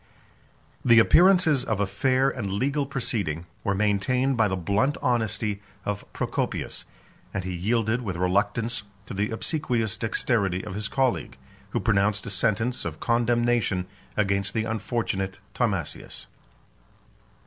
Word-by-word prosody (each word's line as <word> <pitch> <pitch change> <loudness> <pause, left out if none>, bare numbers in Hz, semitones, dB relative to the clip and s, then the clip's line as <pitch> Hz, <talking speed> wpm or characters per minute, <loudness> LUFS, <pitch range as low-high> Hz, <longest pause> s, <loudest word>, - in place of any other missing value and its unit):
The 120 -1 +6
appearances 170 +2 +6
of 110 -3 -1
a 100 - +3
fair 130 +6 +2
and 105 -6 -4
legal 140 +8 0
proceeding 105 - -1 0.2
were 100 - +1
maintained 105 +7 +1
by 110 -2 +3
the 95 - -1
blunt 100 - +1
honesty 110 -5 0 0.2
of 105 0 -4
Procopius; - - -3 0.5
and 100 - -1
he 95 0 -3
yielded 110 +6 0
with 100 -7 -3
reluctance 100 +6 0 0.2
to - - -7
the 100 +2 0
obsequious 115 - -1
dexterity 100 -4 0
of 105 - -6
his 105 +1 -2
colleague, 130 -2 0 0.3
who - - -1
pronounced 100 -1 +1
a - - -5
sentence 115 +4 0
of 80 -2 -5
condemnation 120 -5 +1 0.3
against 100 -1 0
the 110 - +1
unfortunate 105 -4 -2 0.2
Timasius. 100 - -2
110 Hz, 130 wpm, -26 LUFS, 100-120 Hz, 0.5 s, The